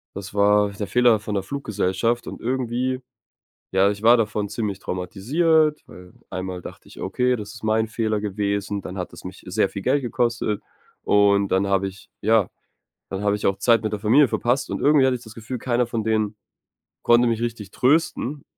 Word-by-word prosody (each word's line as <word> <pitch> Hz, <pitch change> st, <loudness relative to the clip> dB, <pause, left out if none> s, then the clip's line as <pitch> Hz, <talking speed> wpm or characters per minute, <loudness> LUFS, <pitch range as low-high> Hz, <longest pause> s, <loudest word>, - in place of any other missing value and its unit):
Das 100 Hz, 0 st, -7 dB
war, 105 Hz, 0 st, +4 dB
äh, 100 Hz, -, -10 dB
der 100 Hz, 0 st, -4 dB
Fehler 120 Hz, +3 st, +4 dB
von 105 Hz, 0 st, -5 dB
der 95 Hz, -, -1 dB
Fluggesellschaft 115 Hz, -1 st, -1 dB
und -, -, -7 dB
irgendwie, 130 Hz, +1 st, -1 dB, 0.7 s
ja, 95 Hz, +1 st, +3 dB
ich 105 Hz, +1 st, -5 dB
war 120 Hz, +2 st, +7 dB
davon 105 Hz, -2 st, -1 dB
ziemlich 105 Hz, -2 st, -3 dB
traumatisiert. 150 Hz, -, +1 dB
Weil 90 Hz, 0 st, -14 dB, 0.2 s
einmal 95 Hz, -1 st, -5 dB
dachte -, -, -11 dB
ich -, -, -12 dB
okay, 125 Hz, 0 st, 0 dB
das 105 Hz, -1 st, -8 dB
ist 115 Hz, -, -11 dB
mein 110 Hz, 0 st, +1 dB
Fehler 110 Hz, -2 st, -1 dB
gewesen, 100 Hz, 0 st, -2 dB
dann 90 Hz, -, -7 dB
hat 90 Hz, -, -5 dB
es -, -, -12 dB
mich 90 Hz, +1 st, -9 dB
sehr 90 Hz, +1 st, +1 dB
viel 100 Hz, +1 st, -7 dB
Geld 135 Hz, +4 st, +1 dB
gekostet. 115 Hz, -3 st, -1 dB, 0.4 s
Und 100 Hz, -1 st, +3 dB
dann 95 Hz, +1 st, +1 dB
habe 95 Hz, 0 st, +1 dB
ich 95 Hz, 0 st, -14 dB
ja, 110 Hz, -2 st, +3 dB, 0.6 s
dann 95 Hz, +1 st, -4 dB
habe 105 Hz, 0 st, +2 dB
ich -, -, -3 dB
auch 95 Hz, -, +1 dB
Zeit 115 Hz, -2 st, +3 dB
mit 110 Hz, -1 st, -2 dB
der 105 Hz, -, -3 dB
Familie 125 Hz, +6 st, +5 dB
verpasst. 120 Hz, +4 st, 0 dB
Und -, -, -3 dB
irgendwie 145 Hz, -2 st, +5 dB
hatte 130 Hz, -1 st, +2 dB
ich 120 Hz, -, -13 dB
das 110 Hz, -1 st, -12 dB
Gefühl, 115 Hz, +2 st, -6 dB
keiner 120 Hz, 0 st, 0 dB
von 115 Hz, -2 st, -3 dB
denen 110 Hz, -1 st, 0 dB, 0.7 s
konnte 120 Hz, +1 st, +5 dB
mich 115 Hz, 0 st, 0 dB
richtig 110 Hz, -4 st, -4 dB
trösten. 145 Hz, 0 st, +1 dB
110 Hz, 195 wpm, -23 LUFS, 100-120 Hz, 0.7 s, war